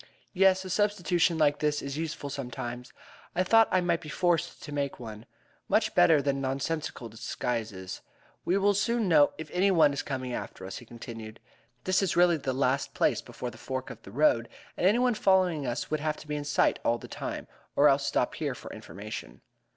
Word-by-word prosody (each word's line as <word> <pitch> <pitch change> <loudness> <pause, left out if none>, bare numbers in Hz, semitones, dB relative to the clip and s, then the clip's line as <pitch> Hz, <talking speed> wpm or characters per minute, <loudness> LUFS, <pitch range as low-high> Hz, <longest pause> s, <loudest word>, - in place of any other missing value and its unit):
"Yes, 190 0 +4
a - - -6
substitution 180 -4 +2
like 145 -2 +3
this 150 -1 +1
is 140 0 -5
useful 150 -2 -4
sometimes. 125 -2 -6 0.4
I 185 - +3
thought 225 +4 +5
I 185 - +3
might 170 -1 +1
be 155 - -9
forced 175 +1 0
to 145 - -8
make 140 -1 -2
one. 110 -2 -9 0.4
Much - - +2
better 145 - +5
than 140 -1 0
nonsensical 135 -1 -3
disguises. 110 -3 -4 0.4
We 180 - +2
will 200 +1 +3
soon 230 +2 +1
know 150 -4 +5
if 160 -1 -8
any 185 +3 +3
one 160 -6 +5
is 140 - -2
coming 130 -2 -4
after 95 - -6
us," 95 0 -6
he 120 - -10
continued. 115 -1 -9 0.4
"This 185 +1 +2
is 190 -4 0
really 175 -1 +5
the 135 -3 -2
last 130 +1 0
place - - +2
before 125 - -7
the 110 - -14
fork 130 +1 -4
of - - -11
the - - -12
road, 120 -1 +2 0.3
and 180 - +2
anyone 245 +4 +3
following 185 - +2
us 120 - -3
would 155 - +1
have 155 0 -1
to - - -12
be 150 - -2
in 145 -1 -4
sight 145 - +2
all 120 - +2
the - - -10
time, - - -5 0.3
or - - +6
else - - +4
stop - - +1
here - - -3
for - - -9
information." 100 - -8
145 Hz, 200 wpm, -29 LUFS, 125-180 Hz, 0.4 s, or